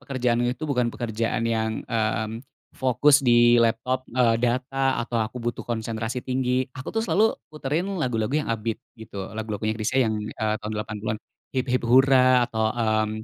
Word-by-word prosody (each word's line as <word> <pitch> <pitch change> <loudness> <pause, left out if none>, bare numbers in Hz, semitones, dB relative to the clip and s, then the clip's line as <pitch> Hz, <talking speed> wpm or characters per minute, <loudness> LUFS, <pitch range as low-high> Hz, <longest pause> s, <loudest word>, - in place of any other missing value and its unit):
pekerjaannya 125 -2 0
itu 155 - -5
bukan 125 -5 +1
pekerjaan 115 0 -2
yang, 110 -1 -1
mmm, 110 0 -1 0.3
fokus 140 +3 +4
di 120 0 +6
laptop, 125 +3 0
eee, 120 -2 +2
data 130 +2 0
atau 115 -1 -2
aku 110 +3 -3
butuh 120 0 -3
konsentrasi 115 +1 -3
tinggi, 130 0 0
aku 130 - -8
tuh 225 - 0
selalu 220 +1 +2 0.2
puterin 155 +3 -2 0.2
lagu-lagu 115 -4 -1
yang 150 -3 0
upbeat 115 0 -2 0.2
gitu. 100 -3 -7
Lagu-lagunya 110 0 -3
Chrisye 120 +4 +1
yang, 110 - -1
eee, 110 0 -2
tahun 105 - -4
80-an, 105 0 -4 0.3
"Hip-hip 125 -1 0
Hura," 130 0 +5
atau, 110 -1 0
mmm, 110 -2 0
120 Hz, 155 wpm, -24 LUFS, 110-130 Hz, 0.3 s, di